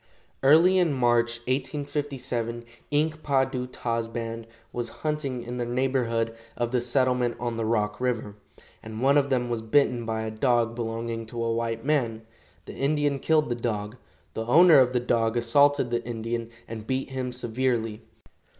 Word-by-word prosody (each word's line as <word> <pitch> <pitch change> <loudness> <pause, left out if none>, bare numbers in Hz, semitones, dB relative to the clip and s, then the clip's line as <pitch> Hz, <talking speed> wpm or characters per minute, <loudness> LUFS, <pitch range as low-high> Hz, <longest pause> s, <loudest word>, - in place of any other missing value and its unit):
Early 165 +7 +6
in 170 -5 +2
March, 120 -2 +2
1857, 130 -3 -3 0.2
Ink 155 +1 0
pa 135 -3 +2
du 125 -1 -4
ta's 115 -2 -2
band 115 0 -5 0.3
was 120 -1 -3 0.2
hunting 140 -5 -2
in 120 +1 -6
the 120 - -1
neighborhood 120 -3 0 0.2
of 120 -1 -1
the 125 -1 +1
settlement 125 -1 +1
on 120 0 -2
the 115 -1 -2
Rock 105 -1 0
river, 115 -5 -1 0.5
and 110 0 -8
one 140 +1 +5
of 140 -1 +3
them 125 -2 +1
was 120 -2 -2
bitten 120 +1 +2
by 110 0 -2
a 110 - -4
dog 115 0 +1
belonging 115 -1 -4
to 115 0 -4
a 115 0 0
white 115 0 -2
man. 120 -7 0 0.4
The - - -8
Indian 145 0 0
killed 155 -1 +2
the - - +1
dog. 110 -2 -3 0.4
The 110 0 -4
owner 165 +3 +7
of 130 -1 +3
the 125 - +2
dog 115 -1 +1
assaulted 135 +2 +3
the 120 0 0
Indian, 115 0 -4 0.2
and 110 -1 -7
beat 130 +1 -2
him 130 -1 -3
severely. 120 -2 -1
120 Hz, 170 wpm, -26 LUFS, 115-135 Hz, 0.5 s, owner